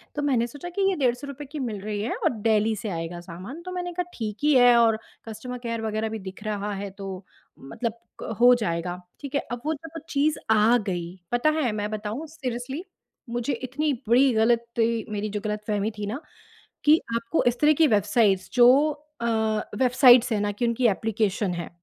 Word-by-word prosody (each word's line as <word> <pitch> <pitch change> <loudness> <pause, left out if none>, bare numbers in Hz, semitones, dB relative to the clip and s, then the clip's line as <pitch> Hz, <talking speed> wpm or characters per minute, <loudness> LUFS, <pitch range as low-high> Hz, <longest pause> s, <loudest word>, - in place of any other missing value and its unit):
तो 295 - -1
मैंने 260 -5 +2
सोचा 290 +8 -8
कि 400 - 0
ये 385 - 0
₹150 275 +1 -2
की 305 - -5
मिल 230 -6 -3
रही 205 0 -3
है 225 - -2
और - - +1
डेल्ही 220 0 +2
से 210 +1 -5
आएगा 165 -1 -4
सामान, 185 - -9
तो 365 +1 -7
मैंने 355 -1 -3
कहा 360 +1 -1
ठीक 215 -3 -4
ही 300 0 +4
है 245 -1 +7
और 225 -2 +4 0.3
कस्टमर 250 +3 -6
केयर 230 -1 -3
वग़ैरह 220 0 -2
भी 220 - -5
दिख 190 +1 -9
रहा 210 -1 -3
है 200 0 -5
तो 195 -1 -7 0.3
मतलब 220 - -4 0.3
क 225 - -4
हो 245 +1 +8
जाएगा, 175 -5 -2 0.2
ठीक 280 -1 -6
है। 280 - +2
अब 240 0 -4
वो 315 - +1
जब 325 +2 -8
चीज़ 295 +2 +1
आ 220 +2 +5
गई, 180 -4 -4
पता 245 +5 +3
है 285 -7 +1
मैं 210 0 -3
बताऊँ 215 +7 -4
सीरियसली 270 0 -5 0.5
मुझे 240 +3 -1
इतनी 295 +4 -1 0.2
बड़ी 255 +3 +5
गलती 230 0 +1
मेरी 210 0 -2
जो 210 0 -3
गलतफ़हमी 210 0 -1
थी 210 - -3
ना 230 +7 -3 0.7
कि 305 +2 +7 0.2
आपको 230 +7 0
इस 245 0 +1
तरह 300 +1 +6
की 320 - +5
वेबसाइट्स 205 -3 +2
जो 240 -1 +7 0.5
अ, - - -1 0.5
वेबसाइट्स 250 -1 +6
है 210 - +1
ना 205 0 0
कि 235 +4 -1
उनकी 235 +1 +2
एप्लीकेशन 210 -2 0
है। 170 -1 -5
230 Hz, 195 wpm, -25 LUFS, 210-260 Hz, 0.7 s, हो